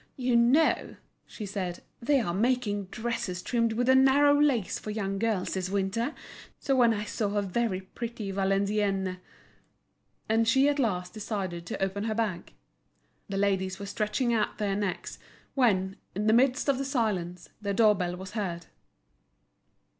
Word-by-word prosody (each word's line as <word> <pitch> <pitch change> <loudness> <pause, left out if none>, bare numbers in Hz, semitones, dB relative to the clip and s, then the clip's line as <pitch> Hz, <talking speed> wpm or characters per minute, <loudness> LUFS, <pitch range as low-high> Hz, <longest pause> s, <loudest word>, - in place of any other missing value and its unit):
"You 250 -2 +1
know," 245 +7 +3 0.3
she 215 - -7
said, 190 -3 -4 0.2
"they 275 +4 +3
are 175 -8 -1
making 210 -1 0
dresses 205 -4 -4
trimmed 230 -2 +1
with 245 +2 0
a 260 - +6
narrow 285 +2 +5
lace 255 -10 +1
for - - -7
young 195 -2 -2
girls 215 -4 0
this 185 -1 -2
winter. 200 +8 -1 0.4
So 275 - +1
when 240 -3 +5
I 210 -2 -1
saw 210 -1 -2
a 205 - +1
very 195 0 -1
pretty 220 +1 -6
Valenciennes—" 195 -1 0 1.1
And 225 +1 +2
she 265 +5 +4
at 290 0 +1
last 180 -8 -1
decided 195 -6 -4
to - - -3
open 200 +2 -2
her 220 -1 -1
bag. 210 -6 -2 0.8
The 195 - -2
ladies 190 -2 0
were 200 - -6
stretching 215 +4 -1
out 220 - 0
their 205 -2 -1
necks, 200 -3 -3 0.3
when, 195 -7 +2 0.2
in 205 +2 -1
the 215 - +4
midst 255 +3 +3
of 275 -2 +2
the - - -1
silence, 195 - -2
the 200 -1 -2
door 215 +1 +5
bell 180 -3 -2
was 190 +1 -8
heard. 175 -6 -3
210 Hz, 160 wpm, -28 LUFS, 190-235 Hz, 1.1 s, a